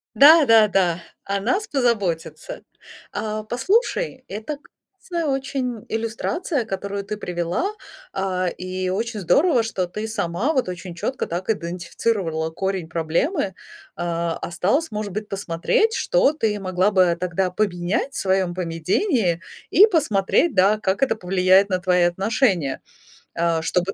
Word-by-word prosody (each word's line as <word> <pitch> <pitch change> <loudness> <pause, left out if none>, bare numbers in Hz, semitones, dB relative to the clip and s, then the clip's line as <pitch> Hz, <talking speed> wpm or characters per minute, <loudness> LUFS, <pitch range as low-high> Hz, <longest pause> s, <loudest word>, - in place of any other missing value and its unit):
Да-да-да, 220 - +6 0.2
о 200 0 -2
нас 315 - 0
позаботятся. 235 - -1 0.5
А, 215 0 -3
послушай, 265 - 0
это 220 +9 -5 0.4
классная 340 -3 -3
очень 260 -4 -2
иллюстрация, 230 - -2
которую 200 -1 -4
ты 210 +1 -5
привела, 180 - -2 0.4
а, 185 -1 -1
и 185 +1 -3
очень 220 +4 -2
здорово, 265 - +3
что 190 -5 -2
ты 210 +5 -5
сама 220 - -1
вот 260 -10 0
очень 180 0 -7
чётко 255 +9 -2
так 175 +5 -5
идентифицировала 175 -2 -2
корень 190 0 -2
проблемы. 170 - -1 0.4
А, 170 -1 -2
осталось, 200 - -1
может 210 -2 -4
быть, 210 +2 -4
посмотреть, 200 - 0
что - - +3
ты 220 -8 0
могла 185 +1 +1
бы 180 -4 +3
тогда 180 +1 0
поменять 180 +5 -1
в - - -5
своём 190 -2 +1
поведении 180 - 0 0.3
и 405 +8 +8
посмотреть, 295 - +2
да, 195 +3 +4
как 195 -1 -1
это 270 - +2
повлияет 190 0 +3
на 185 - 0
твои 180 -1 +2
отношения, 190 - 0 0.5
а, 165 -1 +1
чтобы 180 +4 0
195 Hz, 130 wpm, -22 LUFS, 180-245 Hz, 0.5 s, и